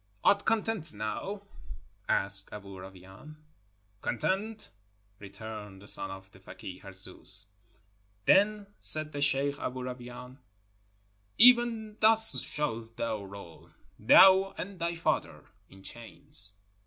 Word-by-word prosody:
"Art 200 Hz, 0 st, +3 dB
content 225 Hz, -, -1 dB
now?" 150 Hz, -, -5 dB, 0.7 s
asked 100 Hz, 0 st, +2 dB
Aboo 100 Hz, -2 st, -10 dB
Rawain. 95 Hz, +10 st, -13 dB, 0.7 s
"Content," 205 Hz, -, -3 dB, 0.5 s
returned 105 Hz, 0 st, -9 dB
the 100 Hz, -, -15 dB
son -, -, -2 dB
of 95 Hz, 0 st, -11 dB
the 95 Hz, -, -18 dB
fakeeh 95 Hz, -1 st, -11 dB
Harzooz. 95 Hz, 0 st, -2 dB, 0.8 s
Then 205 Hz, +1 st, +3 dB
said 155 Hz, 0 st, +1 dB
the 145 Hz, -, -5 dB
sheikh 140 Hz, 0 st, +1 dB
Aboo 130 Hz, 0 st, -5 dB
Rawain: 125 Hz, +1 st, -9 dB, 1.0 s
"Even 230 Hz, -3 st, +5 dB
thus 220 Hz, 0 st, +7 dB
shalt 115 Hz, -6 st, -3 dB
thou 110 Hz, -3 st, -3 dB
roll, 95 Hz, -4 st, -12 dB, 0.3 s
thou 190 Hz, -, +6 dB
and 185 Hz, +1 st, -7 dB
thy 170 Hz, 0 st, -2 dB
father, 165 Hz, -, -2 dB, 0.2 s
in 95 Hz, 0 st, -16 dB
chains!" 115 Hz, -1 st, -4 dB
125 Hz, 110 wpm, -29 LUFS, -, 1.0 s, thus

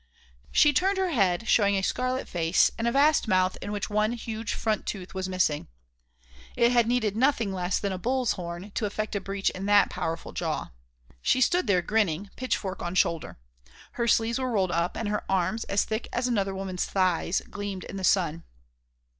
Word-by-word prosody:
She 295 Hz, -1 st, +5 dB
turned 385 Hz, +7 st, +2 dB
her 380 Hz, -2 st, 0 dB
head, 200 Hz, -, +1 dB
showing 200 Hz, -3 st, +4 dB
a 190 Hz, -, 0 dB
scarlet 255 Hz, +4 st, -1 dB
face 165 Hz, 0 st, +2 dB
and 230 Hz, -, -2 dB
a -, -, +2 dB
vast 285 Hz, +1 st, +3 dB
mouth 185 Hz, -2 st, +2 dB
in 205 Hz, -, -5 dB
which 205 Hz, -2 st, -2 dB
one 215 Hz, +2 st, +1 dB
huge 225 Hz, -2 st, -4 dB
front 220 Hz, -1 st, -1 dB
tooth 190 Hz, -3 st, -5 dB
was 190 Hz, 0 st, -3 dB
missing. 175 Hz, -5 st, 0 dB, 0.9 s
It 235 Hz, 0 st, +4 dB
had 240 Hz, -2 st, +3 dB
needed 225 Hz, -4 st, +1 dB
nothing 230 Hz, -5 st, +2 dB
less 180 Hz, 0 st, -1 dB
than 200 Hz, -, -2 dB
a 185 Hz, -, -4 dB
bull's 250 Hz, +3 st, 0 dB
horn 175 Hz, +2 st, -6 dB
to 210 Hz, -, -1 dB
effect 215 Hz, +1 st, -4 dB
a 200 Hz, -, -1 dB
breach 195 Hz, +1 st, -1 dB
in 190 Hz, +2 st, -5 dB
that 205 Hz, 0 st, +5 dB
powerful 165 Hz, +1 st, -4 dB
jaw. -, -, -3 dB, 0.5 s
She 255 Hz, -, +2 dB
stood 350 Hz, +3 st, +2 dB
there 180 Hz, -3 st, +3 dB
grinning, 200 Hz, -3 st, 0 dB
pitchfork 200 Hz, -7 st, -3 dB
on 175 Hz, +1 st, -4 dB
shoulder. 170 Hz, -3 st, 0 dB, 0.5 s
Her 235 Hz, -1 st, -2 dB
sleeves 230 Hz, +2 st, +2 dB
were 260 Hz, -1 st, -1 dB
rolled 195 Hz, -6 st, +1 dB
up 170 Hz, 0 st, -1 dB
and 225 Hz, -, -2 dB
her 210 Hz, 0 st, -1 dB
arms, 190 Hz, +4 st, 0 dB
as 200 Hz, -, +1 dB
thick 220 Hz, +1 st, -3 dB
as 245 Hz, +1 st, -1 dB
another 200 Hz, -5 st, 0 dB
woman's 190 Hz, -2 st, -3 dB
thighs, 185 Hz, -2 st, 0 dB
gleamed 200 Hz, -2 st, -5 dB
in 195 Hz, -, -7 dB
the 190 Hz, -, -5 dB
sun. 170 Hz, -4 st, +2 dB
205 Hz, 195 wpm, -27 LUFS, 185-235 Hz, 0.9 s, She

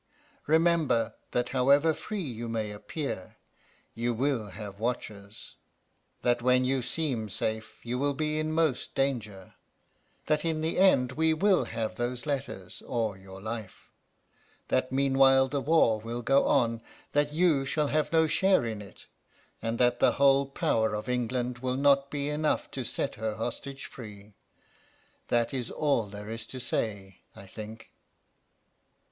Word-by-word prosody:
Remember 160 Hz, -8 st, +3 dB, 0.2 s
that 125 Hz, 0 st, -1 dB
however 140 Hz, +5 st, +4 dB
free 205 Hz, +4 st, -5 dB
you 120 Hz, -5 st, -5 dB
may 110 Hz, -2 st, -2 dB
appear 105 Hz, -, -5 dB, 0.6 s
you 120 Hz, +1 st, -1 dB
will 130 Hz, -3 st, 0 dB
have 100 Hz, 0 st, -8 dB
watchers, 105 Hz, -3 st, -5 dB, 0.7 s
that 120 Hz, -1 st, +2 dB
when 125 Hz, +1 st, +4 dB
you 130 Hz, 0 st, +1 dB
seem 125 Hz, -6 st, -2 dB
safe 110 Hz, +3 st, -3 dB
you 120 Hz, +1 st, -3 dB
will 140 Hz, 0 st, +1 dB
be 155 Hz, +1 st, -1 dB
in 155 Hz, 0 st, -1 dB
most 155 Hz, -5 st, 0 dB
danger, 110 Hz, -9 st, -2 dB, 0.7 s
that 150 Hz, -1 st, +1 dB
in 160 Hz, -2 st, 0 dB
the 160 Hz, +3 st, -1 dB
end 135 Hz, -10 st, +5 dB
we 160 Hz, +3 st, +2 dB
will 190 Hz, +3 st, +3 dB
have 110 Hz, -1 st, -4 dB
those 120 Hz, +2 st, -3 dB
letters 140 Hz, -3 st, -4 dB
or 115 Hz, -5 st, -1 dB
your 95 Hz, 0 st, -12 dB
life; 110 Hz, -1 st, -7 dB, 0.8 s
that 130 Hz, 0 st, +1 dB
meanwhile 135 Hz, 0 st, +4 dB
the 140 Hz, +1 st, -2 dB
war 140 Hz, -8 st, +3 dB
will 115 Hz, +2 st, -5 dB
go 135 Hz, +3 st, +4 dB
on, 115 Hz, -1 st, +2 dB, 0.3 s
that 145 Hz, 0 st, +2 dB
you 155 Hz, -3 st, +3 dB
shall 145 Hz, +2 st, 0 dB
have 155 Hz, 0 st, 0 dB
no 160 Hz, -1 st, +5 dB
share 190 Hz, -2 st, +3 dB
in 110 Hz, -2 st, -4 dB
it, 100 Hz, -, -13 dB, 0.6 s
and 115 Hz, +1 st, -2 dB
that 120 Hz, 0 st, +3 dB
the -, -, +4 dB
whole 140 Hz, 0 st, +4 dB
power 110 Hz, -5 st, +1 dB
of 105 Hz, -, -5 dB
England 125 Hz, 0 st, -1 dB
will 130 Hz, 0 st, -1 dB
not 140 Hz, 0 st, +4 dB
be 145 Hz, -1 st, -2 dB
enough 150 Hz, +1 st, 0 dB
to 130 Hz, -, -4 dB
set -, -, -2 dB
her 110 Hz, -1 st, -1 dB
hostage 135 Hz, +5 st, -5 dB
free. 105 Hz, -3 st, -11 dB, 0.9 s
That 120 Hz, 0 st, +1 dB
is 125 Hz, -3 st, -3 dB
all 140 Hz, -8 st, +1 dB
there 105 Hz, +2 st, -8 dB
is 115 Hz, 0 st, -6 dB
to 130 Hz, -, -7 dB
say, 100 Hz, -6 st, -3 dB, 0.2 s
I 95 Hz, -, -11 dB
think.... 110 Hz, +3 st, -10 dB
125 Hz, 150 wpm, -29 LUFS, 110-145 Hz, 0.9 s, end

